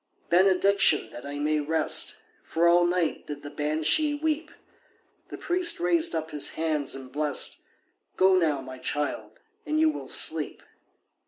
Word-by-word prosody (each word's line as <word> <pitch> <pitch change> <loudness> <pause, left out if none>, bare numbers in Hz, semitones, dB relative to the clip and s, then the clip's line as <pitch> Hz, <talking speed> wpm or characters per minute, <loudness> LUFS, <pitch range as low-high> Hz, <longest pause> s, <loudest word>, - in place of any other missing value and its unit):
"Benediction, 190 - +3
that 120 - -9
I 145 0 -6
may 150 +1 0
rest, 155 +1 0 0.3
For 170 +1 0
all 175 +1 +5
night 175 -2 -1
did 145 -1 -7
the 145 - -8
Banshee 155 - +1
weep." 315 +1 -2 0.8
The - - -9
priest 350 -1 +2
raised 170 -2 +1
up 160 0 -4
his 150 -1 0
hands 155 -4 -2
and 130 -1 -10
blest— 150 0 -2 0.6
"Go 190 0 +5
now, 155 -6 +1
my 130 -1 -10
child, 145 +2 -4 0.2
and 310 0 -1
you 315 0 +4
will - - -8
sleep." - - +1
160 Hz, 150 wpm, -26 LUFS, 150-190 Hz, 0.8 s, all